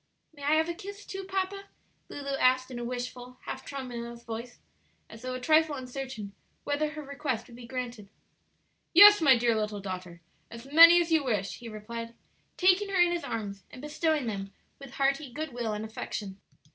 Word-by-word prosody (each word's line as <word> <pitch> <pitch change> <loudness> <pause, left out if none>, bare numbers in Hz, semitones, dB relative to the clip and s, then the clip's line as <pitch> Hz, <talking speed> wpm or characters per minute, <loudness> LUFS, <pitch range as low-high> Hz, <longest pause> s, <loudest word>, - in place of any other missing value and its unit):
"May 290 - -15
I 290 +2 +2
have 320 +1 +2
a 340 - -2
kiss 400 +3 -9
too, 385 0 -6
papa?" 385 +1 -3 0.4
Lulu 280 -1 -4
asked 255 0 +3
in 245 - -5
a - - -4
wishful, 250 +1 -6
half - - -5
tremulous 235 -3 -7
voice, 235 +1 -7 0.5
as 220 +1 -11
though 255 +1 -4
a - - -4
trifle 310 +3 +3
uncertain 255 -5 -6 0.3
whether 290 +1 0
her 305 0 -7
request 280 -4 -3
would 235 - -14
be 240 -1 -11
granted. 245 -5 -6 0.9
"Yes, 415 +1 +10
my 270 -5 +6
dear 235 0 +2
little 210 -1 -2
daughter, 185 -3 -7 0.3
as 230 +1 -10
many 335 +5 +9
as 340 -1 -1
you 320 -2 +4
wish," 210 -7 -1
he 235 -1 -8
replied, 230 +2 -7 0.4
taking 375 +2 +4
her 385 -2 0
in 350 0 +5
his 345 -1 -2
arms 200 -4 -5
and 255 - -12
bestowing 300 0 0
them 195 -3 -4 0.3
with 275 -2 -11
hearty 275 0 0
good 305 +1 -5
will 235 -2 -2
and 210 +1 -4
affection. 205 -2 -6
255 Hz, 185 wpm, -29 LUFS, 230-310 Hz, 0.9 s, Yes